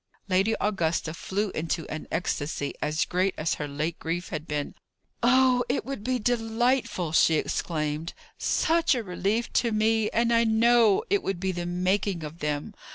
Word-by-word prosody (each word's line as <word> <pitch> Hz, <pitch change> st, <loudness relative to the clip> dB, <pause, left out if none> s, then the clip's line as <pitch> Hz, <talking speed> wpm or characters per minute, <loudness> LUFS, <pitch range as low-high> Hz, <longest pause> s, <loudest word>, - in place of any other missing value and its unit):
Lady 195 Hz, +4 st, +2 dB
Augusta 165 Hz, -6 st, 0 dB
flew 195 Hz, +4 st, -2 dB
into 160 Hz, 0 st, -3 dB
an 155 Hz, -, -6 dB
ecstasy 155 Hz, -4 st, -2 dB
as 155 Hz, +2 st, 0 dB
great 185 Hz, +2 st, 0 dB
as 160 Hz, +1 st, 0 dB
her 150 Hz, -, -2 dB
late 155 Hz, +4 st, -3 dB
grief 170 Hz, +2 st, -3 dB
had 155 Hz, 0 st, -5 dB
been. 145 Hz, -1 st, -3 dB, 0.5 s
"Oh, 250 Hz, 0 st, +4 dB
it 260 Hz, -, -1 dB
would 270 Hz, -6 st, -5 dB
be 255 Hz, +2 st, 0 dB
delightful!" 230 Hz, -, 0 dB
she 160 Hz, 0 st, +4 dB
exclaimed. 155 Hz, +1 st, -2 dB, 0.2 s
"Such 330 Hz, -2 st, +2 dB
a 240 Hz, -, -2 dB
relief 200 Hz, +5 st, -1 dB
to 235 Hz, -, +2 dB
me! 220 Hz, 0 st, +2 dB
and 235 Hz, +1 st, +1 dB
I 230 Hz, 0 st, +4 dB
know 225 Hz, -1 st, +4 dB
it 405 Hz, -1 st, +3 dB
would 195 Hz, -, -3 dB
be 190 Hz, +1 st, -1 dB
the 175 Hz, -1 st, -4 dB
making 185 Hz, 0 st, 0 dB
of 155 Hz, +2 st, -8 dB
them. 150 Hz, +6 st, -3 dB
190 Hz, 165 wpm, -27 LUFS, 160-230 Hz, 0.5 s, Oh